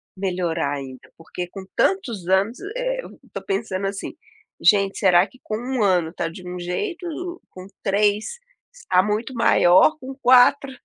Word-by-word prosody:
melhorar, 180 -6 -2
ainda? 130 -2 -9
Porque, 175 +2 -7
com 190 +1 -10
tantos 235 - 0
anos, 195 +6 +1 0.2
eh, - - -2 0.2
estou - - -9
pensando 200 - -2
assim: 195 0 -5 0.5
"Gente 200 -2 +3
será 180 -2 +5
que 250 +6 -20
com 215 - -4
1 250 +1 -3
ano 180 -5 +2
está 165 - -4
de 180 +2 -11
um 180 0 -6
jeito, 335 - -4
ou 350 +2 -6
com 185 0 -11 0.2
3 205 - 0 0.3
está 185 - +1
muito 210 +6 -2
maior, 230 - +4
com 265 -1 -8
4? 255 +2 +5
200 Hz, 155 wpm, -22 LUFS, 180-260 Hz, 0.5 s, será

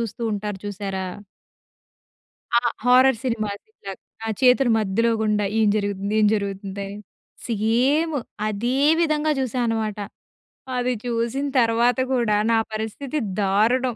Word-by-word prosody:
చూస్తూ 230 0 -5
ఉంటారు 205 -1 -4
చూశారా? 195 -2 -4 1.5
ఆ - - +3 0.2
హారర్ 255 -1 +5
సినిమా 230 -4 -1
ఆది 435 - -17
చాక్ 195 -1 -7 0.3
ఆ - - -2
చేతులు 250 -1 +5
మధ్యలో 220 +3 +1
గుండా 210 -1 +1 0.2
ఏం 215 - +4
జరుగుతుంది? 200 0 -2
ఏం 210 - +5
జరుగుతుందని 200 0 -4 0.5
సేమ్ 250 +9 +1 0.3
అదే 235 +5 -1 0.2
విధంగా 310 -2 +1
జూసా 255 -1 -1
అనమాట. 220 -2 -2 0.8
అది 250 0 0
చూసిన 235 +4 -1
తర్వాత 235 +1 +3 0.2
కూడా 235 -5 +2 0.2
నా 225 - +4 0.2
పరిస్థితి 225 +7 -4 0.2
దారుణం 225 +5 +2
225 Hz, 120 wpm, -23 LUFS, 205-250 Hz, 1.5 s, హారర్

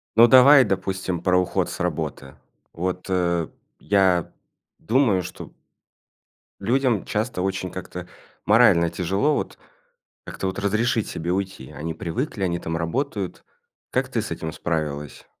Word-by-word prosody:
Ну, 115 +1 +8
давай, 130 +3 +8
допустим, 95 -2 -2
про 90 0 +3
уход 90 - 0
с - - -7
работы. 75 -5 -3 0.4
Вот, 90 +2 -3
э, 85 -3 +1 0.3
я 95 -4 +2 0.5
думаю, 110 - +2
что 90 - -9 1.1
людям 120 +1 +1
часто 105 -2 -2
очень 95 -1 -2
как-то 90 -1 -7 0.4
морально 85 0 +5
тяжело, 95 - 0
вот, - - -4 0.7
как-то 95 - -5
вот 95 - -5
разрешить 110 +3 0
себе 85 +2 -3
уйти. 95 -8 -4
Они 80 +2 -5
привыкли, 95 - -3
они 85 -1 0
там 80 -1 -4
работают. 100 - -3 0.5
Как - - 0
ты - - -1
с - - -6
этим 80 0 -4
справилась? 75 -4 -4
95 Hz, 130 wpm, -23 LUFS, 85-105 Hz, 1.1 s, Ну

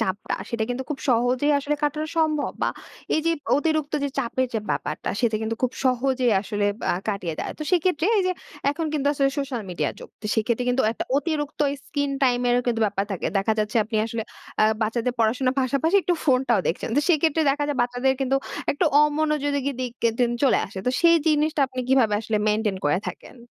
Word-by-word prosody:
চাপটা 190 +2 -2 0.2
সেটা 230 -2 -1
কিন্তু 250 +2 -2
খুব 285 - -2
সহজেই 250 +4 +2
আসলে 290 +1 -1
কাটানো 300 +1 0
সম্ভব 310 -2 +1
বা - - +3 0.5
এই 310 - +2
যে - - +4 0.3
অতিরিক্ত 310 -1 0
যে - - 0
চাপের 260 0 0
যে - - +2
ব্যাপারটা - - -3
সেটা 230 -3 +2
কিন্তু 225 +1 -2
খুব 255 - +1
সহজেই 255 -1 +2
আসলে 205 0 -1 0.2
আ - - +2 0.2
কাটিয়ে 185 -6 -2
দেয়। - - -3
তো 305 - -4 0.2
সেক্ষেত্রে 345 -1 +1
এই - - +3
যে 365 - +2 0.4
এখন 325 +2 -3
কিন্তু 285 -2 -1
আসলে 275 -1 +2
সোশ্যাল 265 -5 -3
মিডিয়া 155 -5 -1
যুগ। - - -10
তো - - -19 0.2
সেক্ষেত্রে 235 +1 +1
কিন্তু 265 +2 +2
একটা - - -4
অতিরিক্ত 295 0 -2 0.2
স্ক্রিন 285 -1 -2
টাইম 250 -2 +3
এরও 245 0 +3
কিন্তু 235 -2 0
ব্যাপার 200 -1 -1
থাকে। 185 - -3
দেখা 195 +3 +2
যাচ্ছে 210 +2 0
আপনি 220 +1 -3
আসলে 230 0 -3 0.4
আ - - +7 0.2
বাচ্চাদের 235 +3 0
পড়াশোনার 255 +4 +2
পাশাপাশি 280 +8 +2
একটু 355 - +1
ফোনটাও 255 -6 +3
দেখছেন। 165 - -1
তো - - +5 0.2
সেক্ষেত্রে 320 0 +3
দেখা 290 +1 0
যায় 290 - -1
বাচ্চাদের 250 +2 +1
কিন্তু 270 0 +2 0.4
একটু 315 +5 0 0.2
অমনোযোগী 300 -1 +1
কি 280 - +1
দিক 250 -2 -3
কিন্তু 230 +2 +2 0.2
চলে 260 - +4
আসে। 190 - -9
তো 250 - +4
সেই 335 0 +6
জিনিসটা 305 0 +2
আপনি 255 -1 -4
কিভাবে 255 -6 +4
আসলে 220 -1 -1
মেইনটেইন 210 -2 +1
করে 145 +4 +2
থাকেন? - - -10
260 Hz, 200 wpm, -24 LUFS, 225-290 Hz, 0.5 s, আ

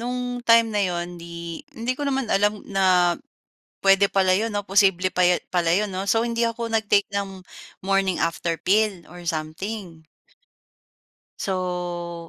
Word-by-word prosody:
nung 245 0 -3
time 230 -1 +4
na 205 - +1
'yon 175 -2 -2
di 170 -1 -7 0.2
hindi 235 +3 -1
ko 285 +2 -3
naman 270 -1 0
alam 205 +1 +1
na 185 -3 +3 0.7
pwede 195 +1 +5
pala 190 -1 +3
'yon 220 +4 +1
'no? 205 -1 -3
Posible 190 -2 +3
pa 180 - +1 0.3
pala 170 -2 +2
'yon 195 +2 +1
'no? 190 +1 -3
So, 225 +2 +2
hindi 235 0 -2
ako 230 0 -5
nag-take 205 -2 +3
ng 195 -2 -4 0.4
morning 195 -2 +1
after 165 0 -1
pill 200 -3 +1
or 175 +2 -12
something. 165 +2 -5 1.4
So,' 175 -2 -3
195 Hz, 145 wpm, -23 LUFS, 175-215 Hz, 1.4 s, pwede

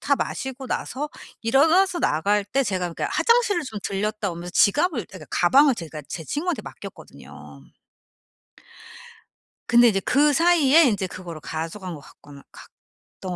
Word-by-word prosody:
다 285 - +1
마시고 265 0 -5
나서 290 +3 -4 0.3
일어나서 320 +10 +3
나갈 200 - +1
때 270 +7 0
제가 185 -6 -2
그니까 - - -3
화장실을 465 -7 +2
좀 220 -7 -7
들렀다 205 +1 -2
오면서 170 +1 -8
지갑을 285 - +2
그러니까 185 -5 -12
가방을 270 +9 +4
제가 160 -5 -8
제 160 - -6
친구한테 330 - -3
맡겼거든요. 70 - -12 2.1
근데 240 0 +6
인제 195 -3 +2
그사이에 300 - +4
인제 205 -7 +1
그거로 175 -3 -9
가져간 165 +4 -6
것 145 - -12
같거나 140 +1 -16
갔던 185 - -13
210 Hz, 330 characters per minute, -23 LUFS, 175-285 Hz, 2.1 s, 근데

